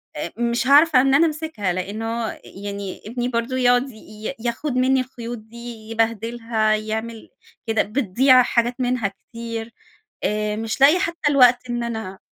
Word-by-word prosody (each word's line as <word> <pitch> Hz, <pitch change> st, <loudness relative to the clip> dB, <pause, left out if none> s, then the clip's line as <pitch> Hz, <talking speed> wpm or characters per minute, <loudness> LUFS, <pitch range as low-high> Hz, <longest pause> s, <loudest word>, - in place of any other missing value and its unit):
آآ، -, -, -4 dB
مش 240 Hz, +1 st, 0 dB
هاعرف 295 Hz, +2 st, +6 dB
إن 265 Hz, +1 st, +5 dB
أنا 325 Hz, +4 st, +5 dB
أمسكها 305 Hz, -, -2 dB
لأنه 220 Hz, +5 st, -3 dB, 0.2 s
يعني، 200 Hz, -1 st, -7 dB
ابني 240 Hz, +3 st, -3 dB
برضه 235 Hz, +1 st, -2 dB
يقعد 245 Hz, +1 st, +3 dB
ي 215 Hz, +1 st, -8 dB
ياخد 240 Hz, +5 st, -3 dB
منّي 260 Hz, +1 st, +3 dB
الخيوط 240 Hz, -2 st, -7 dB
دي، 220 Hz, +2 st, -15 dB, 0.3 s
يبهدلها، 225 Hz, -1 st, 0 dB
يعمل 220 Hz, +1 st, -5 dB, 0.4 s
كده، 225 Hz, -1 st, +2 dB
بتضيع 255 Hz, +3 st, +4 dB
حاجات 240 Hz, 0 st, 0 dB
منها 250 Hz, -4 st, 0 dB
كتير 230 Hz, +3 st, -8 dB, 0.5 s
آآ، 210 Hz, 0 st, -1 dB
مش 220 Hz, +3 st, -4 dB
لاقية 300 Hz, +6 st, +7 dB
حتى 335 Hz, -4 st, -1 dB
الوقت 250 Hz, -2 st, +5 dB
إن 240 Hz, 0 st, -2 dB
أنا 220 Hz, -5 st, -5 dB
235 Hz, 145 wpm, -22 LUFS, 220-255 Hz, 0.5 s, لاقية